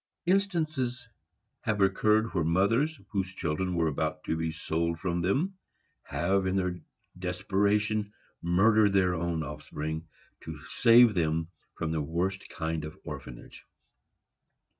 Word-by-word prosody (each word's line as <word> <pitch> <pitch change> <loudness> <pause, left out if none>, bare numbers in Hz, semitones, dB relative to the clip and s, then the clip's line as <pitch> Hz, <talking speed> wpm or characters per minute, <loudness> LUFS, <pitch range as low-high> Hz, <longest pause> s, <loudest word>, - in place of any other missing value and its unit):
Instances 155 -10 0 0.5
have 110 -4 -1
occurred 105 +3 +3
where 85 -4 +1
mothers, 115 - +2
whose 95 -2 -2
children 90 +3 -1
were 85 -1 +2
about 75 - -2
to - - -1
be 80 0 -1
sold 80 +1 -2
from 90 -2 -1
them, 160 - 0 0.4
have, 95 +6 0
in 95 - 0
their 90 -2 -1 0.4
desperation, 100 +3 0 0.3
murdered 105 +4 +4
their 95 -2 +3
own 85 -1 -1
offspring, 80 +1 -5 0.3
to - - -8
save 115 -1 +6
them 80 -2 0 0.3
from 80 0 -2
this 80 -1 0
worst 90 +6 -2
kind 80 -1 -3
of 75 0 -7
orphanage. - - -9
95 Hz, 125 wpm, -29 LUFS, 80-110 Hz, 0.5 s, save